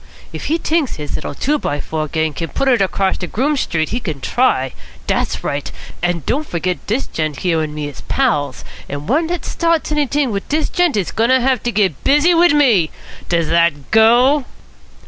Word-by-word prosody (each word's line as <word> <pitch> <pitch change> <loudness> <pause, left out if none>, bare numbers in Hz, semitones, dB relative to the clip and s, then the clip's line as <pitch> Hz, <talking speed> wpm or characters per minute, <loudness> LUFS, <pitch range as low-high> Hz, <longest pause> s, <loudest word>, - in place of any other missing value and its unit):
If - - -6
he 320 - +1
t'inks 320 -4 0
his 150 -1 -6
little - - -4
two 295 - 0
by 145 - -2
four 155 +1 -3
gang 160 0 -1
can 165 +3 -4
put 275 - -1
it 245 -5 +4
across 195 0 0
de 180 - -4
Groome 280 - 0
Street, 160 - -1
he 240 - -2
can 160 - -5
try. 135 - +1 0.3
Dat's - - -1
right. 145 0 -3 0.3
An' 175 -2 -1
don't 295 +5 -1
fergit 180 +1 -2
dis 235 +6 0
gent 155 -3 -3
here 165 -3 +1
and 150 -1 -4
me 150 -1 -3
is 145 - -9
pals, 145 - 0 0.3
and 145 0 -4
any - - -12
one 320 +4 +2
dat 350 +1 -3
starts 335 -2 0
anyt'ing 290 -3 +1
wit 200 -1 -4
dis 305 +1 0
gent 350 -8 +1
is 195 - -1
going 230 +2 +1
to 260 0 +5
have 255 -1 +1
to 240 - -1
git 195 - 0
busy 295 +5 +4
wit 340 -1 +5
me. 225 - +4 0.4
Does 170 -2 +1
dat 170 -4 +1
go?" 245 +6 +5
215 Hz, 205 wpm, -18 LUFS, -, 0.4 s, to